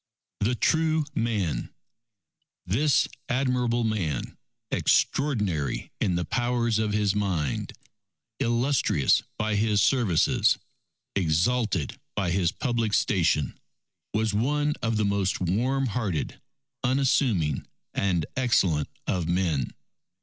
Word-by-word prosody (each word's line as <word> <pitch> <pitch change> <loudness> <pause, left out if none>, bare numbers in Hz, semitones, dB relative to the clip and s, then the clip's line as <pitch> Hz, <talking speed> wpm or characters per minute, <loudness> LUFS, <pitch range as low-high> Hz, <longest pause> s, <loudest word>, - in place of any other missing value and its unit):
The 120 +5 +1
True 160 +3 +2
Man 100 - -1 0.9
This 135 +10 +2 0.2
admirable 125 -2 +1
man, 90 - -2 0.4
extraordinary 105 - +1
in 90 - +1
the 85 -1 -1
powers 120 +1 0
of 110 -1 0
his 105 -1 +1
mind, 95 -9 -1 0.7
illustrious 120 - +2 0.2
by 110 0 0
his 105 0 +2
services, 105 - +3 0.6
exalted 95 - +1 0.2
by 90 -3 0
his 90 -1 +2
public 115 -4 -1
station, 85 -6 +1 0.5
was 110 0 0
one 145 +7 +1
of 115 -1 0
the 105 - +1
most 100 -1 0
warm 125 +10 +1
hearted, 105 - -2 0.4
unassuming, 125 - +1 0.3
and 90 -5 0
excellent 95 - +2 0.2
of 90 -3 -1
men. 85 -8 0
105 Hz, 100 wpm, -26 LUFS, 90-125 Hz, 0.9 s, services